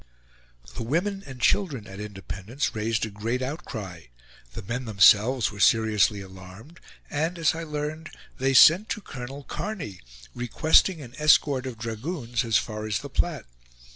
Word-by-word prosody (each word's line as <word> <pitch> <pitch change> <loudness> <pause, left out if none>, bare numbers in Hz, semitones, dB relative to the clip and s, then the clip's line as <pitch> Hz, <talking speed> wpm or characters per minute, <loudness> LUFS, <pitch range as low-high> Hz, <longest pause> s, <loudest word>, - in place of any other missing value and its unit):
The - - -3
women 175 - -1
and 130 -2 -9
children 145 - +1
at 95 0 -10
Independence 100 +4 -5
raised 110 +1 -1
a 110 - -8
great 115 +5 -3
outcry; 110 - -6 0.5
the - - -7
men 125 +6 -4
themselves 110 +3 +4
were 100 - -11
seriously 105 -2 +3
alarmed; 95 - -13 0.3
and, 160 +4 -1
as 165 -2 +2
I 165 - -5
learned, 155 0 -5 0.3
they 135 +1 +1
sent 185 +11 +7
to 215 - -3
Colonel 135 -2 -8
Kearny, 150 - -5 0.3
requesting 155 - +2
an 120 -2 -12
escort 145 -3 +4
of 125 -3 -7
dragoons 115 +2 -3
as 115 -3 +2
far 110 -1 -4
as 105 -2 0
the - - -8
Platte. - - -1
120 Hz, 150 wpm, -26 LUFS, 105-150 Hz, 0.5 s, sent